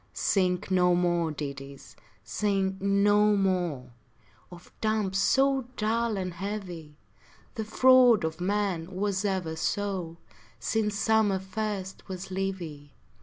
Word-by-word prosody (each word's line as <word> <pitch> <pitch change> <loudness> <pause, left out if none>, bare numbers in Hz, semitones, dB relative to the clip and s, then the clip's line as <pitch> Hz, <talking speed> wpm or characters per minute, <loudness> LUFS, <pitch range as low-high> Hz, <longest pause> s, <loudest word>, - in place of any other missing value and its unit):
Sing 180 -2 +1
no 180 -1 +4
more 175 -2 +1
ditties, 140 -2 -8 0.3
sing 190 - -1
no 205 +1 +3
mo 175 -10 -1 0.6
Of 175 0 -14
dumps 215 -3 0
so 270 +2 +2
dull 225 0 0
and 185 -2 -3
heavy; 180 -6 -6 0.6
The 220 -3 -4
fraud 250 -2 +5
of 160 +1 -3
men 190 -2 -1
was 200 0 -1
ever 185 -5 -1
so, 180 -1 -2 0.4
Since 210 - -1
summer 220 -2 +2
first 195 0 -5
was 190 0 -6
leavy. 175 -7 -5
190 Hz, 115 wpm, -28 LUFS, 175-210 Hz, 0.6 s, fraud